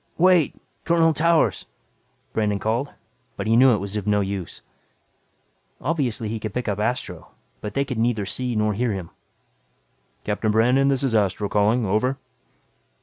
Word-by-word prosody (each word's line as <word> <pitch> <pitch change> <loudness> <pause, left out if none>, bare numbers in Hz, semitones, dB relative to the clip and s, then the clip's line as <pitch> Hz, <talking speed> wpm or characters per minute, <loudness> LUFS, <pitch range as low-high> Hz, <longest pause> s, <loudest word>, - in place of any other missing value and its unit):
"Wait! 180 -3 +4 0.3
Colonel 165 -1 +3
Towers!" 165 +2 +2 0.7
Brandon 105 -2 0
called. 115 +7 -1 0.5
But 100 - -3
he 110 +1 +3
knew 125 0 +6
it - - -1
was 100 +1 -5
no 105 0 +3
use. 95 -3 -5 1.2
Obviously 130 -8 -1
he 110 +1 -3
could 110 -1 -6
pick 125 -1 -2
up 105 -1 -1
Astro 105 -6 -3 0.3
but 105 -1 -6
they 140 - +1
could 125 -4 -4
neither 115 -3 0
see 125 +5 -3
nor 105 0 +1
hear 115 +2 -1
him. 95 -4 -6 1.1
"Captain 105 +1 -1
Brandon, 125 +5 +3
this 140 -1 +1
is 130 -4 0
Astro 100 -1 +1
calling. 105 +4 +2
Over." 110 +7 0
110 Hz, 150 wpm, -23 LUFS, 105-130 Hz, 1.2 s, knew